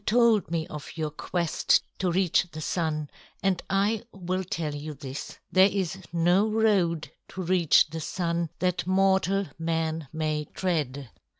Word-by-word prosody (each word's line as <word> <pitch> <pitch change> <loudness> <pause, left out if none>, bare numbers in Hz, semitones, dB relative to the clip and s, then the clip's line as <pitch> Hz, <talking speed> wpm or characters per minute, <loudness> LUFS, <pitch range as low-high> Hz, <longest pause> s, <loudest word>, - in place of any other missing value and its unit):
You - - -34
told 230 -6 +4
me 165 -1 -1
of 150 +2 -9
your 155 -1 -2
quest 170 +2 +1 0.2
to 180 -1 +1
reach 180 0 +2
the 155 - -7
Sun, 155 -2 -2 0.3
and 190 -3 +1
I 200 +3 +1
will 185 0 -3
tell 160 -4 -3
you 150 +1 -6
this. 135 -1 -7
There 190 +1 +6
is 190 -2 -2
no 175 +5 +3
road 200 -7 +2 0.2
to 185 - -6
reach 175 -3 +4
the 165 - -4
Sun 170 0 -1
that 180 -1 -1
mortal 195 +1 +3
man 165 -2 -1
may 155 -1 -1
tread. 140 - -2
170 Hz, 155 wpm, -27 LUFS, 155-190 Hz, 0.3 s, There